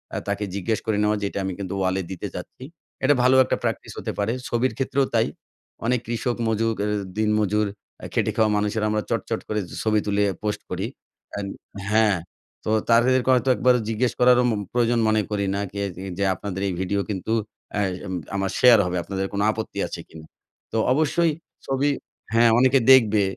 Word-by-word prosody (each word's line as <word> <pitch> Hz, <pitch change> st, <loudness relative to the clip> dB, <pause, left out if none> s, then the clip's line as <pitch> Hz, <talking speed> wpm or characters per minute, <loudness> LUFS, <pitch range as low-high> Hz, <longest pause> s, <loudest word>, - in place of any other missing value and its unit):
আ -, -, -1 dB
তাকে 100 Hz, +1 st, -1 dB
জিজ্ঞেস 105 Hz, +3 st, -1 dB
করে 110 Hz, -2 st, 0 dB
নেওয়া 105 Hz, 0 st, +2 dB
যে -, -, -1 dB
"এটা 100 Hz, -, -4 dB
আমি 95 Hz, -, -2 dB
কিন্তু 100 Hz, -1 st, -4 dB
ওয়ালে 95 Hz, 0 st, 0 dB
দিতে 95 Hz, -, -5 dB
চাচ্ছি," -, -, -8 dB, 0.4 s
এটা 145 Hz, -, +5 dB
ভালো 130 Hz, +1 st, +5 dB
একটা -, -, 0 dB
প্র্যাকটিস -, -, -3 dB
হতে -, -, -3 dB
পারে 100 Hz, +3 st, +1 dB
ছবির 120 Hz, +1 st, 0 dB
ক্ষেত্রেও 135 Hz, 0 st, +1 dB
তাই। 115 Hz, -1 st, +3 dB, 0.6 s
অনেক 125 Hz, +1 st, +2 dB
কৃষক 120 Hz, +1 st, -1 dB
মজুর 115 Hz, 0 st, +1 dB
অ্যা 105 Hz, -, 0 dB, 0.3 s
দিন 110 Hz, -1 st, +2 dB
মজুর 105 Hz, 0 st, +1 dB, 0.4 s
আ -, -, -5 dB
খেটে -, -, +1 dB
খাওয়া 110 Hz, -1 st, +3 dB
মানুষেরা 105 Hz, +1 st, 0 dB
আমরা 105 Hz, -1 st, 0 dB
চট, -, -, 0 dB
চট -, -, -1 dB
করে 105 Hz, 0 st, 0 dB, 0.2 s
ছবি 110 Hz, -1 st, +3 dB
তুলে 105 Hz, 0 st, +2 dB, 0.2 s
পোস্ট 105 Hz, -1 st, -2 dB
করি। -, -, -2 dB, 0.5 s
অ্যান 100 Hz, -1 st, -4 dB, 0.5 s
হ্যাঁ, 110 Hz, -3 st, +4 dB, 0.5 s
তো -, -, -2 dB, 0.2 s
তাদেরকে 125 Hz, +2 st, +4 dB
হয়তো 130 Hz, +1 st, +2 dB
একবারও 125 Hz, 0 st, +3 dB
জিজ্ঞেস 115 Hz, +2 st, +1 dB
করারও 125 Hz, 0 st, +6 dB
মু 115 Hz, -, +1 dB, 0.2 s
প্রয়োজন 120 Hz, -1 st, +2 dB
মনে 110 Hz, 0 st, +3 dB
করি 100 Hz, -1 st, 0 dB
না। 100 Hz, -, -1 dB
কে 100 Hz, 0 st, -4 dB
যে, 95 Hz, -, -8 dB
যে 100 Hz, -, 0 dB
আপনাদের 95 Hz, +1 st, -5 dB
এই 95 Hz, -, -1 dB
ভিডিও 100 Hz, +2 st, 0 dB
কিন্তু 100 Hz, +2 st, -3 dB, 0.5 s
আ -, -, +1 dB, 0.2 s
অ্যাম 95 Hz, -, -6 dB, 0.2 s
আমার 95 Hz, -1 st, -1 dB
শেয়ার 120 Hz, -3 st, +7 dB
হবে, 90 Hz, 0 st, -2 dB
আপনাদের 95 Hz, +1 st, -3 dB
কোন 100 Hz, -, -1 dB
আপত্তি 110 Hz, 0 st, -5 dB
আছে -, -, -7 dB
কিনা? 80 Hz, -1 st, -12 dB, 0.5 s
তো 115 Hz, -, -1 dB, 0.2 s
অবশ্যই 160 Hz, +3 st, +2 dB, 0.3 s
ছবি 135 Hz, +2 st, +1 dB, 0.4 s
হ্যাঁ 115 Hz, 0 st, +6 dB
অনেকে 130 Hz, +2 st, +5 dB
দেখবে 110 Hz, -6 st, +6 dB
110 Hz, 195 wpm, -24 LUFS, 100-125 Hz, 0.6 s, শেয়ার